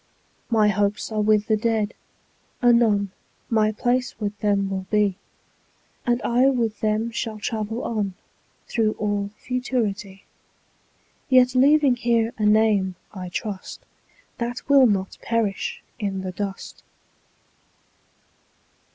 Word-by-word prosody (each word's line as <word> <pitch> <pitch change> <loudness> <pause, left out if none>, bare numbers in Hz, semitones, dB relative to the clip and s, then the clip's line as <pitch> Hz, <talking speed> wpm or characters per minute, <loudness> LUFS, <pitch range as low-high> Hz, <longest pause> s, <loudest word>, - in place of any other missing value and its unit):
My 215 -3 +4
hopes 205 +2 0
are 215 -1 0
with 210 0 +3
the 220 - +2
Dead; 220 -1 0 0.7
anon 230 -5 +3 0.4
My 215 -1 +3
place 245 +2 -1
with 205 -1 -3
them 200 -2 +1
will 190 -1 -4
be, 205 -2 +1 0.9
20 - - -19
And 240 0 +2
I 245 +3 +3
with 235 -5 0
them 215 +2 0
shall 225 -1 -4
travel 220 +1 -3
on 205 -5 -2 0.5
Through 220 -2 +1
all 205 -1 -2
Futurity; 215 -6 -3 1.1
Yet 255 -1 +5
leaving 275 0 +5
here 235 -1 +1
a 210 - +2
name, 210 -3 +3 0.2
I 185 -3 -6
trust, 195 +1 -5 0.6
That 240 +1 -4
will 275 -2 +6
not 195 -3 -1
perish 225 -4 -2 0.2
in 195 -3 -2
the 185 - -4
dust. 195 +1 -6
215 Hz, 120 wpm, -23 LUFS, 205-235 Hz, 1.1 s, will